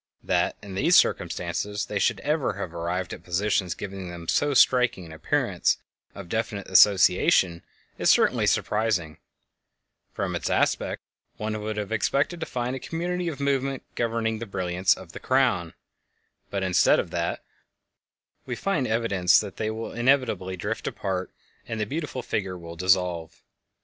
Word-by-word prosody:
That - - +1
in 100 -2 -8
these 95 - +3
circumstances 105 0 +1
they - - -3
should - - +1
ever - - 0
have - - -6
arrived 85 +2 -3
at - - -10
positions 90 -1 0
giving 95 -2 -6
them 85 -1 -9
so 145 - +1
striking 125 -8 +4
an 80 - -11
appearance 80 - 0 0.4
of 100 -3 -8
definite 110 0 -3
association 95 - +5 0.4
is - - +3
certainly - - +4
surprising; 100 -8 0 0.9
from - - -3
its - - -2
aspect - - 0 0.3
one 110 0 -3
would 110 0 -4
have 105 0 -4
expected 140 +9 0
to 160 - -4
find 125 +1 -2
a - - -5
community 175 +4 -3
of 155 -4 -4
movement 135 -1 -1
governing 115 -1 -1
the 115 - -6
brilliants 90 -1 +1
of 90 -3 -11
the - - -8
"Crown," 130 -11 +1 0.7
but 100 -1 -2
instead 95 -1 +4
of - - -3
that - - -2 1.0
we 125 - -2
find 145 -4 -1
evidence 105 -6 +3
that 100 -3 -6
they 110 - -1
will 110 +1 -5
inevitably 120 -7 +1
drift 105 +5 -4
apart 95 -2 -3 0.4
and 115 - -4
the 105 - 0
beautiful 140 0 -4
figure 95 -6 -3
will 85 -1 -9
dissolve. 90 -2 0
105 Hz, 155 wpm, -26 LUFS, 90-120 Hz, 1.0 s, association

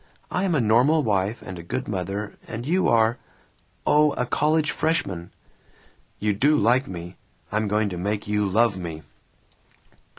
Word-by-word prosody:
I 185 - 0
am 175 -4 +1
a - - +3
normal 125 +8 +4
wife 100 0 0
and 90 -2 -7
a - - -6
good 110 +10 -4
mother, 100 +1 -4
and 115 +2 -6
you 180 +6 +2
are 115 +1 +3 0.7
oh, 150 0 +4
a 125 - -1
college 150 +3 +1
freshman." 95 - -1 0.9
"You 105 0 0
do 145 +9 +3
like 125 +5 +3
me! 90 0 -8 0.3
I'm 110 +1 0
going 105 +1 +1
to 90 - -5
make 105 +3 -2
you 105 -1 +1
love 110 +2 +3
me!" 80 -3 -6
110 Hz, 160 wpm, -24 LUFS, 95-135 Hz, 0.9 s, normal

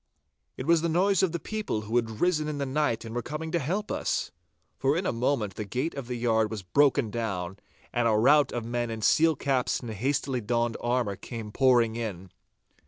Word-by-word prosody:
It 130 - -5
was 165 0 +4
the 170 - 0
noise 190 +3 +3
of 190 - +2
the 170 - -2
people 215 - -3
who 110 +2 -4
had 115 -2 -1
risen 160 -4 +2
in 150 -1 -3
the 140 - -1
night 135 -4 0
and 115 - -7
were 120 - -1
coming 155 +5 -5
to 170 - +1
help 190 +9 -2
us. - - -1 0.5
For 135 +3 +2
in 185 - -2
a - - +1
moment 115 -4 0
the 105 - -4
gate 125 - -2
of 135 -4 -6
the 125 - -3
yard 110 -2 +2
was 105 -3 -5
broken 135 +4 +3
down, 95 -5 -3 0.4
and 120 -1 +2
a - - +3
rout 140 +7 +5
of 120 -2 -3
men 120 0 -2
in 110 -1 -5
steel 160 +6 +4
caps 130 -2 0
and 120 -3 -6
hastily 130 +3 -1
donned 120 +1 0
armour 120 -4 0
came 115 -3 -7
pouring 120 -3 +3
in. 95 -6 -5
120 Hz, 215 wpm, -27 LUFS, 110-150 Hz, 0.5 s, rout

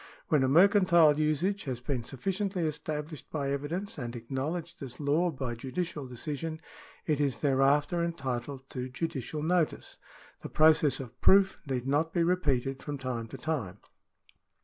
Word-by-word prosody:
When 150 -3 +4
a 130 - +3
mercantile 170 -1 +5
usage 155 +7 0
has 130 -3 -3
been 125 0 -2
sufficiently 190 - -2
established 155 0 -4
by 140 -3 -2
evidence 160 +7 -3
and 120 -2 -5
acknowledged 145 +9 -4
as 125 -3 -8
law 155 +5 +2
by 130 -5 -4
judicial 145 +4 -4
decision, 150 +5 -4 0.5
it 150 -2 +1
is 135 -6 0
thereafter 145 +4 +3
entitled 135 -5 -4
to 125 -1 -4
judicial 150 +1 -4
notice. 170 -1 0 0.4
The - - -7
process 155 -2 +4
of 125 -2 -9
proof 195 0 +5
need 130 -2 -2
not 150 +4 +1
be 170 - +2
repeated 140 -7 0
from 145 -1 -4
time 125 -4 -4
to 135 - -8
time. 125 - -3
145 Hz, 150 wpm, -30 LUFS, 130-165 Hz, 0.5 s, mercantile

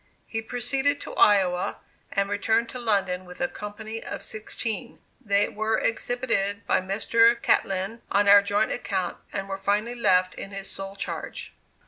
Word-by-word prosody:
He 225 - -3
proceeded 265 +5 0
to - - -7
Iowa, 185 -3 +3 0.3
and 200 -1 +1
returned 220 +3 +1
to 250 - -6
London 195 -5 0
with 180 -1 -12
a 265 - +1
company 220 0 -7
of - - -6
sixteen. 225 +2 -4 0.3
They 200 -2 +3
were 220 +1 -1
exhibited 225 -3 -1
by - - +2
Mr. 230 +5 +3
Catlin 195 +4 0
on 205 0 +3
our 200 0 +9
joint 200 0 +1
account, 185 -3 -2
and 195 -1 -3
were 195 0 -4
finally 205 +4 0
left 185 -6 +3
in - - -7
his 195 -1 -6
sole 195 0 -5
charge. 200 - -5
205 Hz, 155 wpm, -26 LUFS, 195-230 Hz, 0.3 s, our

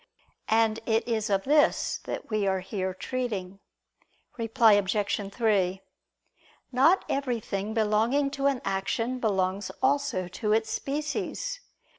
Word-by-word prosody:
And 225 0 +3
it 225 0 +1
is 220 -3 -1
of 195 -1 +1
this 295 +2 +2
that - - -6
we 210 -2 +1
are 190 -1 +1
here 190 0 -3
treating. 195 -2 -4 0.8
Reply 225 -1 +4
Obj. 205 0 0
3: 195 -5 +1 0.9
Not 280 +9 +4
everything 225 -6 -2
belonging 225 +6 +2
to 280 0 0
an 275 -3 0
action 210 +6 -1
belongs 195 -3 0
also 265 -9 +1
to 210 +4 -1
its 220 0 +1
species. 300 - -3
220 Hz, 120 wpm, -27 LUFS, 195-255 Hz, 0.9 s, Reply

